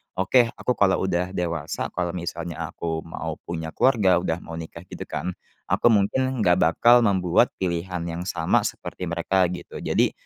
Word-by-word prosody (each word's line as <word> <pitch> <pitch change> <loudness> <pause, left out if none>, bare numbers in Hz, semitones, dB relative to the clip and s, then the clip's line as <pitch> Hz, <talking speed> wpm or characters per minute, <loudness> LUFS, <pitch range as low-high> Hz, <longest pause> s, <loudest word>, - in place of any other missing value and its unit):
oke, 115 +6 +3
aku 125 - -1
kalau 95 -2 +3
udah 90 -1 0
dewasa, 85 -3 -2
kalau 90 -1 -2
misalnya 85 -1 -5 0.2
aku 80 -1 -3
mau 80 -1 -5
punya 80 -1 -4
keluarga 105 -8 +4
udah 80 - -1
mau 80 - -8
nikah, 80 +1 -9
gitu, - - -7
kan, 90 - -3 0.4
aku - - +3
mungkin 120 +4 +2
nggak 90 -2 +4
bakal 120 +10 +5
membuat 95 -4 +3
pilihan 90 0 -2
yang 85 +1 -4
sama 80 -4 +2
seperti 90 - -6
mereka, 85 +2 +1
gitu. 90 0 -7
Jadi, - - +1
90 Hz, 165 wpm, -24 LUFS, 85-95 Hz, 0.4 s, bakal